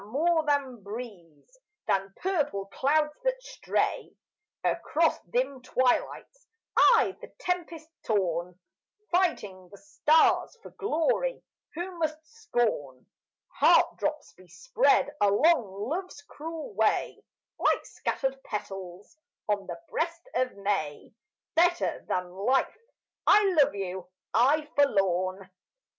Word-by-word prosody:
more 320 +7 +2
than 270 -5 0
breeze, 205 - -10 0.3
than 195 0 0
purple 295 - -1
clouds 300 +2 +2
that - - 0
stray - - -2 0.5
Across 325 +1 +1
dim 260 +1 -1
twilights 260 - -1 0.3
I, - - +5
the - - -11
tempest 345 -6 -3 0.2
torn, 180 -4 -1 0.6
Fighting 205 - 0
the 200 - -12
stars 305 - +2
for - - -11
glory, 435 +6 -1 0.3
who 350 +1 -5
must 310 -1 -1
scorn 240 - -2 0.5
Heart - - +5
drops - - -3
bespread 290 - +1
along 205 - +2
love's 340 -1 -5
cruel 315 -5 -7
way 220 +2 0 0.4
Like - - +2
scattered 270 -1 -3
petals 195 - -7 0.3
on 205 -2 -1
the 175 - -5
breast 335 +7 -3
of 255 -4 0
May 160 -8 -2 0.4
Better 345 +1 +2
than 180 0 -1
life 205 +9 +1 0.5
I 405 -3 +5
love 275 - +2
you, 190 -2 -5 0.3
I 290 +7 +3
forlorn. 190 -8 +1
265 Hz, 105 wpm, -28 LUFS, -, 0.6 s, I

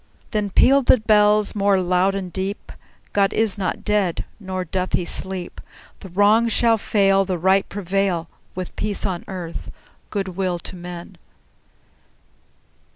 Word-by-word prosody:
Then 210 -2 -1
pealed 270 +6 +4
the - - +7
bells 210 -1 +4
more 200 -2 +2
loud 185 +2 +1
and 185 -3 -5
deep: 195 +2 -4 0.4
"God 200 -1 +2
is 220 -3 +1
not 195 -3 -3
dead; 205 -5 0
nor 185 -2 -4
doth 185 +2 -3
he 175 - +1
sleep! 185 0 -3 0.4
The 190 - -10
Wrong 205 +5 +4
shall 230 0 +2
fail, 195 -2 +3
The 185 -2 -2
Right 190 +3 +2
prevail, 195 -3 -1 0.3
With 185 -1 -6
peace 210 -1 -2
on 185 -3 -3
earth, 175 -3 -6 0.4
good 195 -2 -3
will 185 -1 -2
to 175 - -9
men!" 175 -1 -9
195 Hz, 145 wpm, -21 LUFS, 180-205 Hz, 0.4 s, the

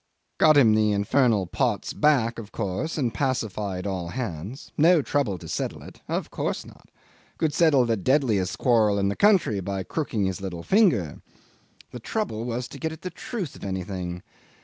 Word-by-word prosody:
Got 155 -2 +6
him 115 -6 +6
the 110 -1 +3
infernal 105 0 +2
pots 85 - -1
back 120 -6 +2
of 105 -2 -9
course 115 - -3
and 125 -6 0
pacified 105 -8 -2
all 95 -3 -3
hands. 105 - -6
No 160 0 +5
trouble 130 -11 0
to - - -11
settle - - -4
it. - - -13
Of - - -3
course - - -3
not. - - -17 0.5
Could 155 -2 0
settle 150 -6 +4
the 115 -1 +1
deadliest 110 -4 +1
quarrel 110 -5 +3
in 100 0 +1
the 100 - -2
country 190 - +3
by 95 0 -3
crooking 115 - -2
his 95 0 -3
little 90 -3 -5
finger. 180 - +2 0.7
The 125 - -7
trouble 120 - -3
was 125 +1 -3
to 140 - -10
get 160 +2 -2
at 160 - -10
the 185 - -4
truth 195 - -5
of - - -12
anything. 90 -2 -4
115 Hz, 175 wpm, -25 LUFS, 95-145 Hz, 0.7 s, Got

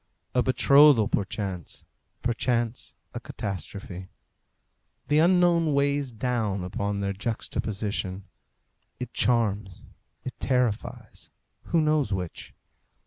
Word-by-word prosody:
A 125 - +3
betrothal 140 -2 +6
perchance, 95 -4 -4 0.4
perchance 120 -1 -1 0.2
a - - -4
catastrophe. 95 -1 -6 1.0
The 150 +1 +4
unknown 170 -3 +4
weighs 140 -1 +1
down 110 -5 -1
upon 100 +2 -2
their 100 0 -1
juxtaposition. 100 -2 -3 0.8
It 125 -1 -6
charms, 105 -6 +1 0.4
it 130 - -5
terrifies; 125 -5 -2 0.4
who 165 - +2
knows 150 -6 +1
which? 90 -3 -4
115 Hz, 90 wpm, -26 LUFS, 100-135 Hz, 1.0 s, betrothal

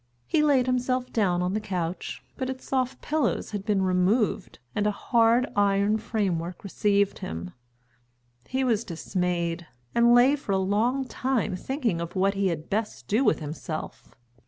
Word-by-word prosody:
He 300 - +2
laid 280 -4 +4
himself 255 0 0
down 180 -5 +2
on 180 +1 -1
the 215 - 0
couch, 180 -4 -4
but 260 -1 -3
its 260 0 -6
soft 260 -1 -1
pillows 310 -1 0
had 205 -2 -4
been 200 -2 +1
removed 190 +3 +1 0.2
and 210 0 +1
a - - +3
hard 230 +3 +3
iron 200 +1 +3
framework 185 -6 -2
received 200 0 +1
him. 85 +2 -5 1.0
He 260 +1 -1
was 235 -4 +1
dismayed, 170 -1 -2 0.3
and 235 0 +5
lay 255 +4 +6
for 270 -8 -3
a - - +3
long 220 +8 +1
time 250 -6 -1
thinking 230 - -2
of 170 +2 -6
what 195 +1 +2
he 195 -1 +1
had 165 -3 -3
best 215 +1 -3
do 220 +6 +2
with 210 -8 +2
himself. 155 +1 -6
205 Hz, 160 wpm, -26 LUFS, 180-245 Hz, 1.0 s, lay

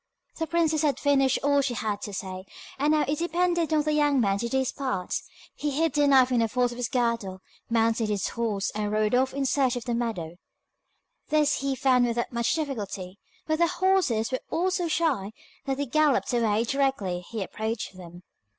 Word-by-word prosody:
The 325 - -1
princess 320 -1 +1
had 295 -3 +1
finished 270 -2 +3
all 285 0 +3
she 260 -3 -2
had 210 -2 -2
to 205 - -5
say, 185 -1 -6 0.3
and 295 +2 +2
now 305 -1 +3
it 290 +2 -1
depended 345 -1 0
on 305 -1 +3
the 305 0 0
young 290 -2 +3
man 200 -4 +1
to 235 - -2
do 265 - 0
his 265 -1 0
part. 255 -10 -3 0.4
He 295 - -3
hid 310 +1 0
the 290 -1 +3
knife 260 -2 +5
in 245 - +3
the 230 - +2
folds 245 +2 0
of - - -10
his 240 -2 -1
girdle, 230 -6 -1 0.3
mounted 225 -1 +1
his 205 -3 -1
horse, 215 -4 -2
and 210 0 -3
rode 215 +1 +1
off 260 +1 +3
in 275 0 -2
search 265 -2 +2
of 245 - -5
the 240 - -1
meadow. 215 -9 -3 0.9
This 300 -1 +3
he 275 0 -1
found 255 -1 +3
without 235 +1 -2
much 235 0 0
difficulty, 205 - -4 0.3
but 315 0 0
the 340 - +4
horses 350 -12 +1
were 255 - -2
all 365 +3 0
so 360 -2 -1
shy 290 -12 0 0.3
that 270 -1 -1
they 285 - -1
galloped 295 -1 +2
away 225 -2 +2
directly 240 -9 0
he 225 -3 -3
approached 220 +1 -4
them. 175 -1 -12
250 Hz, 205 wpm, -26 LUFS, 220-290 Hz, 0.9 s, knife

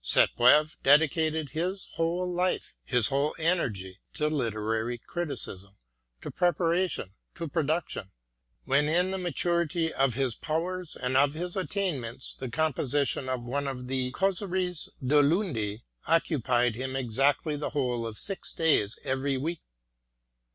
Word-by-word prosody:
Sainte - - +3
Beuve 150 +6 +5
dedicated 155 +1 +3
his 180 +7 -2
whole 170 +2 0
life, 180 +1 -1
his 125 -4 +1
whole 140 +2 0
energy, 110 - -1 0.2
to 150 0 +1
literary 115 -3 -1
criticism, 100 - -5 0.5
to - - -5
preparation, 175 - +1 0.2
to 170 - -4
production: 155 - -1 0.5
when 140 +3 +2
in 180 +3 +2
the 190 - -2
maturity 170 -2 0
of 135 -3 +2
his 130 -2 0
powers 170 +5 -3
and 125 0 -2
of 140 +2 +4
his 175 +2 -3
attainments 170 - -2
the 130 - -6
composition 140 -2 0
of 130 -2 -2
one 140 +3 -2
of 125 -2 -4
the 130 -1 0
Causeries 185 0 -1 0.2
du 145 +3 +5
Lundi 140 - 0 0.2
occupied 125 -7 +2
him 130 +3 -4
exactly 135 +5 +1
the 145 - -3
whole 125 -5 -1
of 110 -2 -6
six 195 -1 -2
days 150 -10 +2
every 135 +1 0
week. 160 +5 -2
145 Hz, 135 wpm, -28 LUFS, 125-170 Hz, 0.5 s, Beuve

